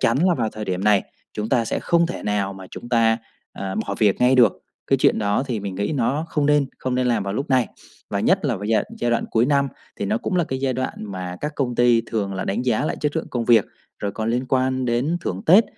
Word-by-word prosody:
chắn 115 +3 +2
là 180 - +3
vào 115 -6 0
thời 110 - -5
điểm 95 -1 -2
này 105 -2 +4 0.3
chúng 105 +1 -3
ta 120 -2 +2
sẽ - - -2
không 170 -1 +2
thể 175 - -6
nào 100 -1 -1
mà 95 -1 -10
chúng 120 - -9
ta, 115 -2 +3 0.3
ờ, 95 -1 -5
bỏ 100 - -2
việc 105 -3 +3
ngay 125 +1 +5
được, 120 -6 +6 0.3
cái - - +3
chuyện - - +3
đó 105 +2 +1
thì 115 -5 -2
mình 100 -1 -5
nghĩ 100 +9 -1
nó 145 +3 0
không 150 -3 0
nên 150 -1 +3
không 130 -1 -2
nên 125 0 +1
làm 120 -4 +1
vào 100 0 -3
lúc 140 +5 -3
này. 130 -3 +3 0.4
Và - - -1
nhất - - +2
là - - +1
với 105 +2 -5
giai 110 -1 +3
đ - - -7
giai 120 - 0
đoạn 120 - +1
cuối 115 +2 +3
năm 140 -1 +2 0.3
thì - - -3
nó 215 - 0
cũng 190 - -2
là 175 - +3
cái 130 -3 -3
giai 135 -1 +1
đoạn 130 +1 -2 0.2
mà 90 -1 -5
các 150 - -3
công 125 -4 -1
ty 120 -1 +4
thường 100 -4 -2
là 95 - -3
đánh 100 - -1
giá 125 +2 +1
lại - - -2
chất 150 +1 -1
lượng 160 - -2
công 120 -2 -2
việc, 115 -3 +5 0.3
rồi 100 -1 -3
còn 110 +1 -2
liên 125 +2 -1
quan 130 -1 +1
đến 125 +8 0
thưởng 95 - -4
Tết, 195 +8 +7
120 Hz, 275 wpm, -22 LUFS, 105-135 Hz, 0.4 s, Tết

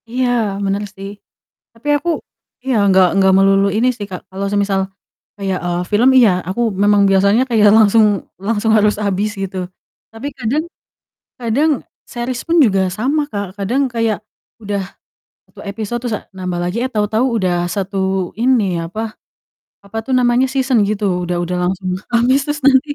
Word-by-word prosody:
Iya, 250 +2 0 0.4
bener 200 +1 -1
sih. 195 +1 -7 0.6
Tapi 230 +5 -9
aku 320 +4 -4 0.6
iya, 265 -1 0 0.2
nggak 190 -1 +5
nggak 190 -1 +4
melulu 195 0 +4
ini 240 +3 +3
sih, 205 - -5
Kak, 180 - -6
kalau 195 +1 -4
semisal 200 -1 +1 0.6
kayak, 190 -2 -1
eee, 175 0 -1
film, 225 +5 +4
iya 235 -5 +6 0.2
aku 190 +6 -3 0.2
memang 205 0 +4
biasanya 200 +5 +4
kayak 220 -3 +4
langsung 220 0 +5 0.4
langsung 225 0 0
harus 210 0 +3
habis, 200 +1 -1
gitu. 190 -1 -4 0.5
Tapi 225 +5 -6
kadang 260 +6 -1 0.8
kadang 245 +7 +1 0.4
series 240 +1 -4
pun 335 +1 +2
juga 195 -4 +2
sama, 275 +8 0
Kak, 200 -5 -6
kadang 235 +8 0
kayak 230 -3 -1 0.4
udah 200 -1 -2 0.7
1 - - -14
episode, 215 +3 -4
terus, 235 -3 -1
eee, - - -22
nambah 180 -2 -3
lagi, 180 +5 -3
eh 260 - -1
tahu-tahu 215 +2 0
udah 175 -3 0
satu 190 -1 -2
ini, 220 -8 +1
apa 215 +6 -5 0.7
apa 200 +2 -11
tuh 265 - -4
namanya, 250 0 +3
season 260 -4 +1
gitu 200 -3 -1
udah 175 0 -2
udah 175 +1 -2
langsung 185 +1 -2 0.2
habis 255 +4 +3
terus 295 0 -3
nanti 275 +2 +4
210 Hz, 160 wpm, -17 LUFS, 195-240 Hz, 0.8 s, iya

